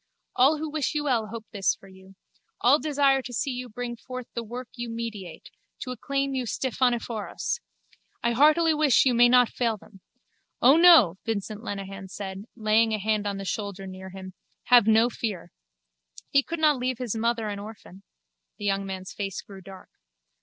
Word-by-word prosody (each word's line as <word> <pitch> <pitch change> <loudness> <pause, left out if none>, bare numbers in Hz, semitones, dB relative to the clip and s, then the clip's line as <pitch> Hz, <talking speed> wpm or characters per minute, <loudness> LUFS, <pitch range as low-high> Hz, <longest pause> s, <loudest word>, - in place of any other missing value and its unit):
All 275 +5 +4
who 315 +1 -4
wish 305 -1 -2
you 300 - 0
well 240 -6 0
hope 225 +1 -8
this 200 -4 +1
for 195 - -18
you. 190 0 -17 0.4
All 270 +5 +5
desire 280 -3 +2
to 250 - -9
see 265 +3 -1
you 250 0 -6
bring 240 +2 -5
forth 255 +1 -8
the 235 - -3
work 240 +3 -7
you 240 0 -6
meditate, 220 -7 -7 0.3
to 255 - -4
acclaim 275 +2 -2
you 260 -2 -2
Stephaneforos. 240 - -1 0.6
I 235 - +2
heartily 310 +6 +4
wish 300 -5 +4
you 255 - +3
may 240 +1 +6
not 250 -1 +5
fail 230 -3 -1
them. 195 -1 -18 0.6
O 265 +4 +6
no, 315 - +7
Vincent 215 -1 -4
Lenehan 195 -2 -6
said, 195 +1 -7
laying 220 0 +2
a - - -2
hand 210 0 -1
on 200 -1 -3
the 195 - -6
shoulder 200 -1 -4
near 190 0 -9
him. 190 0 -9 0.3
Have 240 -4 +5
no 220 +1 +5
fear. 215 -7 -5 0.8
He 280 - +5
could 335 +4 -5
not 305 -3 +4
leave 255 0 -2
his 245 -3 -3
mother 230 0 0
an 205 -1 -5
orphan. 205 -2 -11 0.6
The 205 - -6
young 195 -1 0
man's 190 -1 -6
face 195 -2 -5
grew 195 -2 -12
dark. 190 0 -13
230 Hz, 180 wpm, -26 LUFS, 200-255 Hz, 0.8 s, no